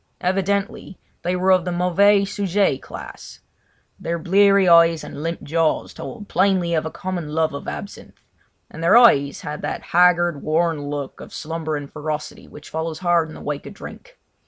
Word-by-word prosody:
Evidently 195 +1 -2 0.2
they 180 +1 -1
were 185 +1 +2
of 185 -2 +4
the 180 - -3
mauvais 195 +3 +3
sujet 195 -7 0
class; - - -10 0.6
their 170 0 -3
bleary 195 +2 +4
eyes 170 -1 +5
and - - -8
limp 165 +2 -4
jaws 160 +1 0
told 210 -4 -9
plainly 185 -3 +1
of 160 -1 0
a - - -4
common 175 -3 -5
love 160 -2 +1
of 140 - -7
absinthe; 200 - -8 0.5
and 160 - -9
their 170 - +6
eyes 145 - +4
had 150 0 -6
that - - -4
haggard, 175 -3 +4
worn 155 -2 0
look 145 -2 -5
of - - -11
slumbering 155 -2 -4
ferocity 150 +1 -6
which 150 - -13
follows 160 0 -3
hard 175 -2 +1
in - - -10
the - - -11
wake 145 -1 -5
of - - -10
drink. - - -12
170 Hz, 170 wpm, -21 LUFS, 155-190 Hz, 0.6 s, their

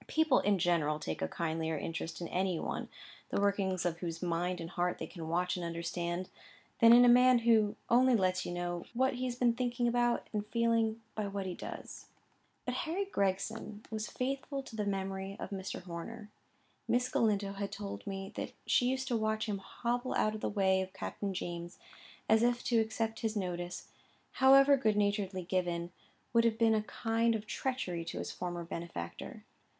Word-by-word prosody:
People, 315 -4 +3
in 205 -1 +2
general, 165 -4 +2
take 80 - -4
a 80 - +1
kindlier 160 - -2
interest 165 +3 -4
in 170 - -3
any 185 -2 0
one, - - -3 0.4
the - - 0
workings 195 -3 +1
of 170 -1 -1
whose 165 -2 -4
mind 175 +1 -1
and 165 +1 -6
heart 180 0 0
they - - -4
can 165 -3 -7
watch 180 +2 +1
and 180 - -4
understand, 170 +1 -3 0.5
than 230 -2 +8
in 245 +1 +9
a - - +6
man 250 +1 +7
who 220 -3 +3
only 250 +1 +5
lets 185 -3 +2
you - - -4
know 175 0 -3
what 260 +2 +3
he 255 +1 -3
has 245 -1 -2
been 245 -1 +3
thinking 245 0 0
about 240 0 +1
and 210 0 -2
feeling, 230 0 +1
by 215 -2 -2
what 200 -1 -3
he 185 - -3
does. - - -8 0.6
But 250 - -1
Harry 335 +9 -1
Gregson 205 - -2
was 215 -1 -3
faithful 275 +2 -3
to 230 - -10
the 210 -2 -1
memory 195 0 -3
of - - -6
Mr. 190 -1 -5
Horner. 205 +5 -7 0.6
Miss 250 +1 +2
Galindo 205 -5 +1
has 200 0 -3
told 205 0 -6
me 195 0 -4
that - - -5
she 245 - +3
used 260 0 -1
to 240 - +1
watch 220 -1 0
him 205 -3 -2
hobble 240 +5 -2
out 215 - +2
of 215 - -6
the - - 0
way 190 -2 +2
of 190 0 -5
Captain 200 +1 -4
James, 175 -1 -5 0.5
as 220 0 +5
if 240 0 +2
to 235 -2 +3
accept 220 0 -1
his 225 -2 -1
notice, 175 -3 -3 0.5
however 275 +1 +8
good 215 -5 +2
naturedly 200 -2 0
given, 175 -2 -1 0.4
would 230 0 +5
have 230 -1 +2
been 225 -1 +4
a 215 - +2
kind 230 +1 0
of 215 -1 -4
treachery 215 -7 -2
to 165 - -5
his - - -4
former 175 -1 -4
benefactor. 165 - -6
205 Hz, 190 wpm, -33 LUFS, 180-235 Hz, 0.6 s, in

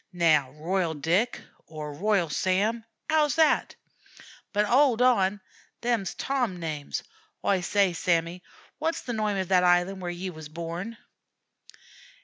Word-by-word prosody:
Now 160 -6 +3
'Royal 165 +2 -1
Dick,' 175 - 0 0.3
or 150 -2 -7
'Royal 195 +2 +1
Sam,' 200 +8 0 0.3
'ow's 300 -3 +3
that? 320 -1 +3 0.8
But 210 0 +2
'owld 250 +1 +4
on; 205 -6 +3 0.4
them's 235 -5 -1
Tom 245 -10 -1
names. 155 -4 -4 0.4
Oi 195 -2 +2
say, 195 0 +2
Sammy, 170 +1 0 0.4
wot's 325 0 -1
the 245 - -4
noime 215 -2 0
of 190 -1 -2
that 180 -1 +4
island 180 +2 +3
where 175 - -3
ye 180 +2 -4
wuz 155 -2 -9
born?" 170 +7 -5
185 Hz, 130 wpm, -27 LUFS, 170-220 Hz, 0.8 s, owld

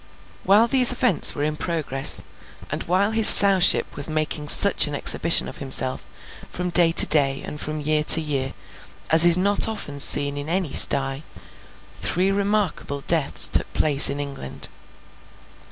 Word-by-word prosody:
While 205 +4 +1
these 255 0 +5
events 250 0 +2
were 145 - -6
in 150 0 -5
progress, 150 -5 -2 0.5
and - - -7
while 190 +4 -3
his 220 -1 +3
Sowship 195 -3 +3
was 145 +2 +3
making 155 -1 -6
such 200 +1 +2
an 145 - -8
exhibition 165 +3 +1
of - - -13
himself, 130 -1 -2 0.5
from 180 0 -8
day 170 -1 +1
to - - +5
day 140 -3 -2
and 150 - -11
from 155 0 -7
year 150 +1 -1
to 160 - +3
year, 140 -4 -4 0.6
as 160 +1 +6
is 175 0 +6
not 200 +2 -1
often 175 -10 -9
seen 145 0 +2
in 145 +2 -9
any 175 -5 -5
sty, 135 0 -1 0.7
three 185 +3 -4
remarkable 200 -8 -5
deaths 160 -1 +2
took - - -1
place 145 -2 +4
in 140 - -6
England. 140 - -9
155 Hz, 155 wpm, -19 LUFS, 145-190 Hz, 0.7 s, as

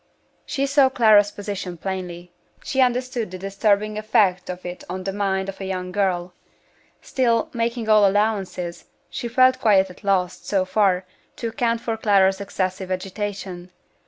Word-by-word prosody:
She 275 0 -1
saw 280 -1 +4
Clara's 215 -5 +5
position 200 -4 -6
plainly; 180 -1 -5 0.3
she 270 -3 0
understood 250 -3 0
the 185 - -7
disturbing 200 +2 0
effect 195 -4 +2
of 180 0 -6
it 180 0 -6
on 185 +1 -4
the 195 +1 -3
mind 190 -1 -1
of 195 0 -7
a - - -4
young 185 -1 -4
girl. 180 -3 -1 0.7
Still, 235 -3 +1
making 230 -1 -2
all 215 -2 +6
allowances, 195 -4 -1 0.3
she 240 - -4
felt 255 +2 +4
quite 195 -4 +4
at - - -16
a - - -17
loss, 185 -2 +1
so 190 -2 0
far, 190 -2 +2 0.3
to 230 - -3
account 230 -1 -1
for 225 -1 -2
Clara's 195 -2 +3
excessive 185 -1 -3
agitation. 190 -1 -5
200 Hz, 160 wpm, -22 LUFS, 185-225 Hz, 0.7 s, all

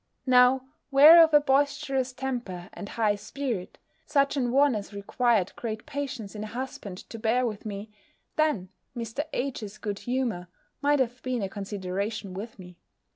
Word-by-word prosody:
Now, 255 0 +5 0.2
were 300 +4 +9
I - - +11
of 320 - +3
a 295 - +7
boisterous 275 -2 +1
temper, 240 -9 -5
and 200 - -8
high 215 -3 +1
spirit, 215 -1 -4 0.3
such 280 -2 +2
an 250 -4 0
one 280 +1 +4
as 205 -1 -5
required 210 -1 +1
great 220 -2 -5
patience 275 -8 -5
in 210 -1 -5
a - - -5
husband 225 -5 -6
to 225 - -7
bear 235 +3 +2
with 215 -2 -4
me, 205 +1 -6 0.4
then 300 -13 +1 0.3
Mr. 235 +5 -3
H.'s 230 -6 -4
good 205 -2 -4
humour 240 -8 -2 0.3
might 290 0 +3
have 245 -1 -1
been 250 -4 -2
a 195 - -2
consideration 200 0 -4
with 220 +5 -7
me. 180 -2 -12
235 Hz, 165 wpm, -27 LUFS, 205-265 Hz, 0.4 s, I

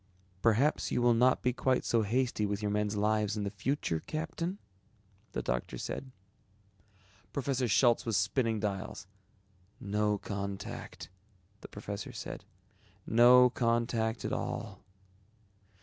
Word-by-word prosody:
"Perhaps 120 +7 +2
you - - +1
will 120 0 +4
not 125 +2 +3
be 125 - +2
quite 130 +1 +1
so 115 - +2
hasty 115 +1 0
with 100 -1 -1
your 105 - 0
men's 105 0 0
lives 105 0 +1
in 105 - -1
the 100 - -2
future, 100 - -1
Captain?" 165 - -4 0.8
the - - -2
doctor 60 0 -2
said. 135 - -5 1.2
Professor 135 -2 -1
Schultz 120 +2 +4
was 115 -4 0
spinning 110 +2 +1
dials. 100 -1 -4 0.7
"No 105 0 0
contact," 100 -2 -6 0.5
the - - -10
professor 100 0 -6
said, - - -7 0.6
"No 125 +2 +7
contact 115 -2 0
at - - -2
all." - - -4
110 Hz, 125 wpm, -31 LUFS, 105-125 Hz, 1.2 s, No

